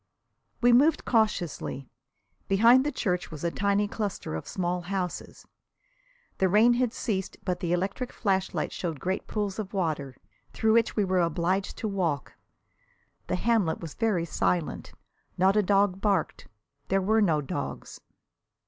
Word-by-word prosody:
We 245 0 +5
moved 295 +6 +4
cautiously. 180 - 0 0.6
Behind 230 +6 +6
the 295 - -1
church 180 -9 -2
was 155 -1 -9
a 170 - 0
tiny 200 +2 +1
cluster 205 - -4
of 80 - -5
small 180 -1 -2
houses. 180 0 -5 0.9
The 190 - +3
rain 220 +5 +5
had 245 -1 +1
ceased, 195 -6 -3
but 180 -2 -1
the 175 -1 -2
electric 195 +8 -1
flashlight 190 -3 -1
showed 165 -5 -4
great 185 +5 -3
pools 205 -1 -3
of 200 -1 -5
water, 150 -8 -2 0.4
through 220 -1 +2
which 230 0 +2
we 210 - +2
were 185 -1 +1
obliged 175 +4 -1
to 220 - -3
walk. 175 -9 -2 0.9
The - - 0
hamlet 200 -4 +1
was 165 -3 -7
very 210 -7 0
silent 170 0 -1 0.5
not 190 +2 +4
a 210 - +5
dog 195 -1 +2
barked. 205 -2 0 0.4
There 195 - +2
were 220 +4 +2
no 165 -7 +3
dogs. 140 - -5
195 Hz, 150 wpm, -27 LUFS, 175-215 Hz, 0.9 s, Behind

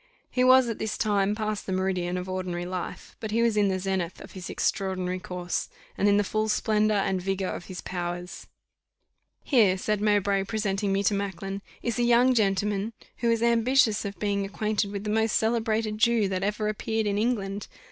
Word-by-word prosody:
He 250 - +2
was 255 0 +6
at 230 - -3
this 220 -1 -2
time 205 -1 +1
past 215 -1 -3
the - - -2
meridian 185 -1 -1
of 180 0 -4
ordinary 185 -2 -3
life, 180 0 -6
but 220 - -5
he 230 +2 +2
was 230 -2 +2
in 205 -1 +3
the 190 -1 0
zenith 185 -2 -2
of - - -11
his 185 -1 -8
extraordinary 185 -2 -1
course, 180 -1 -3 0.3
and 200 - +2
in 200 - +4
the 205 - +3
full 215 +2 -1
splendour 215 0 +2
and 190 -1 0
vigour 195 0 -1
of 175 - -5
his 185 -1 -7
powers. 175 0 -5 1.0
"Here," 215 -9 +4
said 210 +2 -1
Mowbray, 200 -2 +2
presenting 200 -1 -1
me 195 +1 +1
to 205 - +3
Macklin, 195 0 -3 0.2
"is 235 0 -1
a - - +3
young 240 +2 +5
gentleman, 205 0 +1 0.2
who 235 - 0
is 230 0 +2
ambitious 235 -1 +3
of 200 -2 -5
being 200 +1 0
acquainted 210 +1 -1
with 200 -1 -4
the 210 - -2
most 220 0 +2
celebrated 220 -1 0
Jew 230 -2 +3
that 185 -1 -2
ever 210 +2 -1
appeared 220 +1 -1
in 205 0 0
England. 205 -4 -1
205 Hz, 195 wpm, -27 LUFS, 190-220 Hz, 1.0 s, was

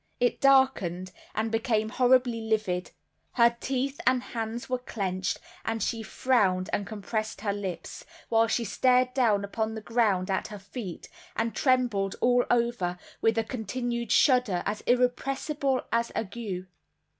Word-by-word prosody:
It 245 0 +1
darkened, 245 -10 +3 0.2
and 220 +1 -1
became 220 -1 +1
horribly 250 -1 +3
livid; 215 -5 -1 0.4
her 235 -1 +4
teeth 270 +2 -2
and 255 -1 +3
hands 230 0 -4
were 255 -1 -1
clenched, 190 -6 -2 0.3
and 225 -2 -2
she 230 +1 -1
frowned 195 -5 +1
and 200 - -1
compressed 215 0 -4
her 205 -2 0
lips, 190 -5 -6 0.2
while 225 0 +3
she 230 +1 0
stared 250 +4 +3
down 215 -6 +2
upon 220 +2 -2
the - - -4
ground 210 -5 +1
at 190 - -1
her 210 - -8
feet, 200 -2 -7 0.3
and 225 0 -1
trembled 245 -7 +1
all 245 0 +4
over 235 -7 +1 0.2
with 225 0 +2
a 225 - +2
continued 235 +1 -3
shudder 250 - +4
as 210 +1 -2
irrepressible 265 +2 +1
as 235 0 +1
ague. 200 -4 -4
225 Hz, 145 wpm, -28 LUFS, 200-250 Hz, 0.4 s, her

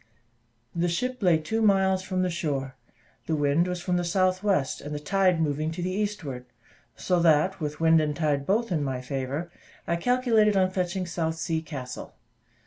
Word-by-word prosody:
The 170 +1 0
ship 250 +9 -2
lay 175 -4 +4
two 220 +9 -2
miles 190 -3 +3
from 185 -1 -1
the 180 - 0
shore, 140 -6 -3 0.5
the 160 - +1
wind 145 +4 +2
was 180 -1 -4
from 180 -2 0
the 175 - 0
south 185 +1 +1
west, 190 -10 0
and 150 +1 -6
the - - -3
tide 185 +2 +2
moving 155 0 0
to 175 - -4
the 185 - -1
eastward; 185 -11 -3 0.5
so 180 -2 0
that, 170 +3 +3
with 150 -2 -4
wind 165 0 +5
and 150 -1 -1
tide 145 -3 0
both 220 +2 +1
in 155 -4 0
my 130 -2 -2
favour, 135 +6 -4 0.3
I 170 - 0
calculated 225 -1 +3
on 185 -1 +3
fetching 185 0 -2
South 165 -2 -2
Sea 160 0 -2
Castle. 130 -6 -7
170 Hz, 185 wpm, -26 LUFS, 150-190 Hz, 0.5 s, wind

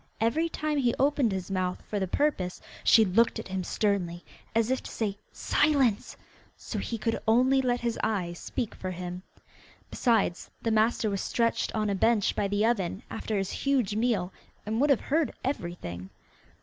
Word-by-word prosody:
Every 270 +10 +1
time 305 -2 -1
he 245 -3 +2
opened 275 -4 +2
his 190 0 -4
mouth 185 -1 -1
for 210 - -2
the 190 - -1
purpose 185 -7 0 0.2
she 220 - +6
looked 220 +5 +3
at - - -7
him 190 0 -2
sternly, 180 -4 -1 0.3
as 230 +2 +2
if 260 - 0
to - - -9
say, 205 -3 -3
'Silence,' 270 -9 +1 0.4
so - - -5
he 230 - -3
could 225 +1 -1
only 255 +4 +4
let 245 -1 0
his 235 -1 -1
eyes 180 -6 -1
speak 235 -4 -3
for 185 - -5
him. 180 0 -5 0.7
Besides, 225 -7 +1
the 230 - -1
master 220 +1 +2
was 195 - -1
stretched 230 -1 0
on 215 -1 0
a 200 - +1
bench 215 +1 +2
by 200 - 0
the 205 +2 +1
oven 200 -4 0
after 220 -1 -2
his 195 -1 -1
huge 260 -8 0
meal, 215 -5 0 0.3
and 220 +3 -1
would 295 - +3
have 275 - +4
heard 310 +2 0
everything. 170 - -4
220 Hz, 175 wpm, -28 LUFS, 190-245 Hz, 0.7 s, she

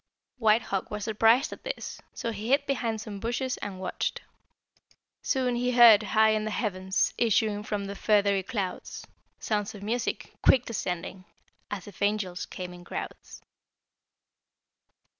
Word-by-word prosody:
White 220 0 +4
Hawk 195 -1 -3
was 210 -1 -4
surprised 225 +5 +3
at - - -12
this, - - -5
so 230 - -4
he 215 0 -6
hid 280 +2 +3
behind 235 -5 -1
some 210 -2 -7
bushes 245 +4 -2
and 195 -2 -6
watched. 185 -1 -3 1.0
"'Soon 255 -3 0
he 250 +1 0
heard, 235 -4 +9
high 220 +1 +3
in 215 0 +1
the 215 - -2
heavens, 190 -3 0
Issuing 215 -2 +2
from 210 -1 -3
the 200 - -5
feathery 200 -1 +2
clouds, 195 -2 -4 0.3
Sounds 210 -1 -2
of 200 - -10
music, 230 +3 -2
quick 250 -2 +5
descending, 185 -4 -4 0.4
As 200 -3 -5
if 205 - -13
angels 200 -3 -1
came 180 -1 -7
in 175 0 -12
crowds.' - - -7
210 Hz, 145 wpm, -28 LUFS, 200-230 Hz, 1.0 s, heard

